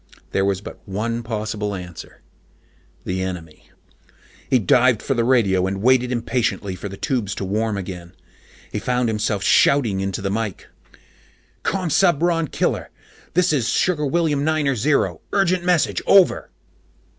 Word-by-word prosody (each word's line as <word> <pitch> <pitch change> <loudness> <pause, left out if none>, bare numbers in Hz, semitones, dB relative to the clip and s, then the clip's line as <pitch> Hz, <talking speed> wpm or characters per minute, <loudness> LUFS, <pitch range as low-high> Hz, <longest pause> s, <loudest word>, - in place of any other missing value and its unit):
There 95 - +1
was 100 -1 0
but - - -10
one 115 +4 -2
possible 105 -2 -3
answer: 90 -3 -10 0.8
the 95 +1 -2
enemy. 85 -4 -7 0.8
He 130 - +4
dived 120 +2 +3
for 135 - -1
the 120 -3 +1
radio 100 -7 +2
and 95 0 -3
waited 125 0 +3
impatiently 115 -5 -1
for 100 - -7
the 95 - -9
tubes 115 -6 -2
to 100 - -4
warm 105 +2 -1
again. 90 -2 -7 0.6
He - - -2
found 125 -1 0
himself 105 -2 -1
shouting 115 -9 +3
into 95 -1 -2
the 100 - -1
mic. 105 -2 -3 1.0
"Commsubron 175 -2 +1
Killer, - - -1 0.5
this 180 -2 +3
is 120 -6 +1
Sugar 150 -5 +1
William 150 -1 +1
Niner 150 -3 +1
Zero. 105 - +1
Urgent 185 -3 +2
message. 175 -3 +1
Over." 195 -2 +4
115 Hz, 140 wpm, -21 LUFS, 95-145 Hz, 1.0 s, He